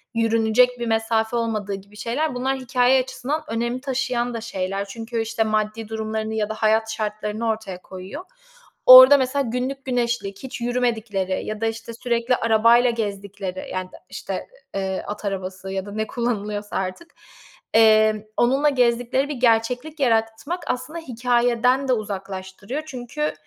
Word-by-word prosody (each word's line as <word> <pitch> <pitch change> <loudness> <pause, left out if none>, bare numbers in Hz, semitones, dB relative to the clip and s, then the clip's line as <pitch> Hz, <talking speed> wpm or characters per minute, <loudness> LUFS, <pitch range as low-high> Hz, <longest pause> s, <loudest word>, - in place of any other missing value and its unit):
yürünecek 230 +2 +3
bir 235 - -3
mesafe 225 0 0
olmadığı 215 -3 -2
gibi 200 +2 -13
şeyler, 260 +6 -2
bunlar 265 +2 -1
hikâye 255 0 +3
açısından 260 +4 -4
önem 235 +2 -2
taşıyan 250 -2 -1
da 230 - -4
şeyler. 195 -2 -3
Çünkü, 225 +3 -4
işte, 225 0 0
maddi 215 0 -1
durumlarını 220 0 -3
ya 215 -1 -1
da - - -2
hayat 220 0 +2
şartlarını 215 +1 -3
ortaya 215 -5 -4
koyuyor. 190 - -8 0.6
Orada 255 +2 +11
mesela 270 +1 0
günlük 260 +3 -3
güneşlik, 235 -5 -2
hiç 260 -2 -7
yürümedikleri 225 -6 -1
ya 215 0 -5
da, - - +1
işte, 225 +1 -5
sürekli 235 +1 0
arabayla 230 +2 +4
gezdikleri, 200 -4 -5
yani, 185 0 -3 0.2
işte, - - -6 0.4
ı - - -1
eee, 190 -1 -2
at 210 +1 -6
arabası 190 -1 -4
ya 190 0 -3
da 205 - -8
ne 220 +1 -2
kullanılıyorsa 210 -3 -3
artık, 190 - -5 0.6
emm, 220 -1 +5 0.2
onunla 270 +5 +3
gezdikleri 245 +1 +1
bir 295 - -3
gerçeklik 245 +5 +1
yaratmak 230 +7 0
aslında 300 +7 -3
hikâyeden 245 -1 +1
de 255 - +3
uzaklaştırıyor. 200 +4 -5
Çünkü 260 +2 -3
230 Hz, 145 wpm, -23 LUFS, 210-250 Hz, 0.6 s, Orada